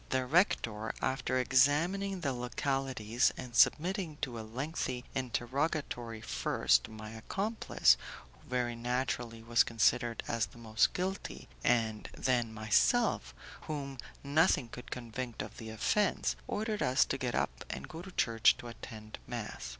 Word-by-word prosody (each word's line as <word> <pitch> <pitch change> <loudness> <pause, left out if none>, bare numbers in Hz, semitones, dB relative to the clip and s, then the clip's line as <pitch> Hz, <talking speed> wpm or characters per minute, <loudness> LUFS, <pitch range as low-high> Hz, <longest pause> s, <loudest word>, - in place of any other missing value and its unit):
The 130 -1 +1
rector, 115 - +2
after 130 -1 0
examining 165 +10 +3
the 140 -4 0
localities 125 -2 0
and 125 -2 -7
submitting 175 -1 +3
to 120 -5 -3
a - - -4
lengthy 125 +2 -3
interrogatory 120 -1 -2
first - - +2
my 110 0 -8
accomplice, 115 - +2 0.4
who - - -24
very 125 -1 0
naturally 120 -1 -2
was 115 0 +4
considered 115 +1 +2
as 115 -3 0
the 100 - -17
most 110 -2 +2
guilty, 190 +2 -4 0.2
and 110 -3 +1
then 120 -3 +1
myself, 110 - +2 0.3
whom 140 -4 -4 0.2
nothing 145 -3 +3
could 125 +1 -9
convict 120 -1 -5
of 105 0 -10
the 110 -1 -7
offence, 185 - +1
ordered 215 0 -2
us 130 +2 +4
to 135 - -2
get 125 -3 -1
up - - -1
and - - -5
go 165 - -8
to 190 +1 -10
church 115 -1 +4
to 120 - -8
attend 110 -2 -9
mass. - - -5
125 Hz, 140 wpm, -32 LUFS, 115-145 Hz, 0.4 s, was